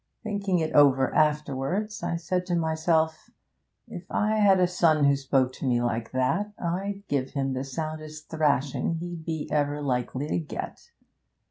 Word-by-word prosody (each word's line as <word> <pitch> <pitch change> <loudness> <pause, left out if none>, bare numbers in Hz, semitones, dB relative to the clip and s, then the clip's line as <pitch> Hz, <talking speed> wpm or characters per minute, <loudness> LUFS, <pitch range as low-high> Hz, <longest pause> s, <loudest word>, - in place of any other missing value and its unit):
Thinking 200 -4 -1
it 160 -2 -1
over 135 -2 +5
afterwards, 150 +7 0
I - - -1
said 180 +2 -2
to 175 - 0
myself: 160 -1 0 0.6
If 185 -5 -9
I 215 +1 +1
had 200 -3 +5
a 180 - +5
son 165 -4 +3
who 140 0 +5
spoke 135 -2 +1
to 135 - -5
me 120 -1 +2
like 120 -1 -2
that, 190 +12 0
I'd 195 +4 -3
give 135 -2 -1
him 135 -1 -1
the 130 +1 -2
soundest 155 +2 -6
thrashing 150 0 0
he'd 170 -1 -6
be 160 -2 -3
ever 145 -1 +1
likely 130 0 -2
to 160 - 0
get. 155 - -7
155 Hz, 160 wpm, -26 LUFS, 140-175 Hz, 0.6 s, over